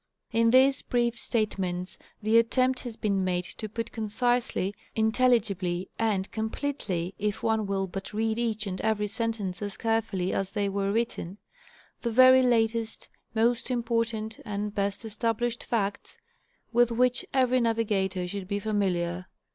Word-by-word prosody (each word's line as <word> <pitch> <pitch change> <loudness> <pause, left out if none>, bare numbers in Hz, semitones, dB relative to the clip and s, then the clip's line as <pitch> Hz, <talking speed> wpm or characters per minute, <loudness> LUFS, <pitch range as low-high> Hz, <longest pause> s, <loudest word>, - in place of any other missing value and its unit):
In 230 0 +3
these 265 +3 +5
brief 240 -1 0
statements 185 -5 -1 0.2
the 220 +2 +5
attempt 255 +3 +2
has 240 -3 -7
been 200 -4 0
made 180 -1 0
to 215 +4 -7
put 230 +2 -4
concisely, 230 -2 0 0.2
intelligibly, 220 -6 +1
and 205 -4 0
completely 220 -6 -3
(if 210 0 -2
one 220 -2 +1
will 195 -1 0
but 195 +1 -7
read 220 +1 0
each 220 -3 -1
and 190 -2 -4
every 220 -1 +1
sentence 210 -3 -3
as 205 -1 -4
carefully 225 -5 0
as 195 -1 -2
they 205 -1 0
were 195 0 -1
written), 210 -4 -2 0.6
the 235 - -1
very 255 +2 +7
latest, 230 -2 +1 0.3
most 230 +3 +2
important, 230 -2 -1
and 205 0 -3
best 200 -1 -1
estab 220 +1 -1
lished 240 0 -2
facts, 205 -4 -2 0.6
with 240 0 +5
which 250 +1 +2
every 255 -1 +3
navigator 205 -5 0
should 195 0 -5
be 200 +1 -1
familiar. 185 -4 -1
220 Hz, 145 wpm, -28 LUFS, 195-235 Hz, 0.6 s, very